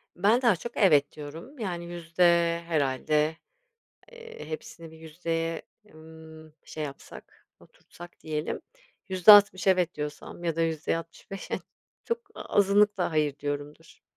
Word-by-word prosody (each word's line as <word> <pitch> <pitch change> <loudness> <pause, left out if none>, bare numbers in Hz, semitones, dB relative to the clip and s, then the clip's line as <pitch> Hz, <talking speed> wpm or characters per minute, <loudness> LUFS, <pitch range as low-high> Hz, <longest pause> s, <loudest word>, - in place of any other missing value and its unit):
Ben 210 +7 +3
daha 235 -7 +4
çok 235 +8 -8
"evet" 150 -8 +4
diyorum, 165 - -10
yani, 175 -5 -4
yüzde 170 0 -2 0.4
herhâlde, 150 +1 0 0.8
eee, 470 - -11
hepsini 160 +1 -8
bir 160 - -15
yüzdeye, 165 +1 -3 0.3
ımm, 160 0 -14
şey 155 -1 -5
yapsak, 140 -1 -11
oturtsak 175 0 -15
diyelim. 155 -1 -3 0.5
%60 190 0 +7
"evet" 180 -2 +3
diyorsam 150 +3 -7
ya 165 -1 -1
da 165 - +1
%65 165 +4 -4 0.6
çok 465 0 -1 0.2
azınlıkla 205 -1 +2
"hayır" 150 -3 0
diyorumdur. 145 +3 -6
165 Hz, 115 wpm, -27 LUFS, 155-185 Hz, 0.8 s, 60